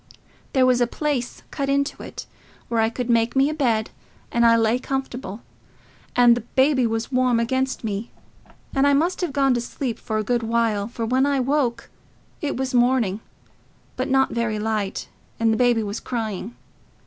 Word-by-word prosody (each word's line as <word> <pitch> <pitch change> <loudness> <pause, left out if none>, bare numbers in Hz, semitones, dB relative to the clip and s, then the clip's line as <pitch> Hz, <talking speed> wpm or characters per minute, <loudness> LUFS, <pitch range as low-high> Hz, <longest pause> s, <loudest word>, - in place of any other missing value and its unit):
There 260 -1 +4
was 250 -1 +3
a 240 - +3
place 275 -2 -3
cut 275 -2 -2
into 280 +1 0
it, - - -8 0.4
where 230 -1 +1
I 220 - +2
could 245 +1 -4
make 235 0 +2
me 270 +2 +4
a - - -3
bed, 235 -8 0 0.4
and 235 - +2
I 230 - +6
lay 225 +2 +2
comfortable, 255 -6 -4 0.7
and 240 -1 +6
the 240 - -3
baby 260 +2 +2
was 225 +3 -3
warm 255 -2 +2
against 260 +3 -1
me; 210 +1 -3 0.6
and 275 0 +3
I 285 - +4
must 340 +7 +1
have 350 -4 -1
gone 275 -2 +3
to 240 - 0
sleep 240 0 -4
for 220 - -3
a 215 - 0
good 240 +2 0
while, 225 -3 0
for 230 0 -4
when 260 +4 +2
I 280 -1 +1
woke 255 -3 0 0.5
it 290 -4 -2
was 260 0 -2
morning, 240 -5 +2 0.8
but 255 +1 -2
not 265 0 +3
very 235 -2 -1
light, 210 -2 -2 0.3
and 225 -1 +3
the - - 0
baby 245 -3 +3
was 205 +1 -4
crying. 220 -2 -4
240 Hz, 185 wpm, -23 LUFS, 225-265 Hz, 0.8 s, I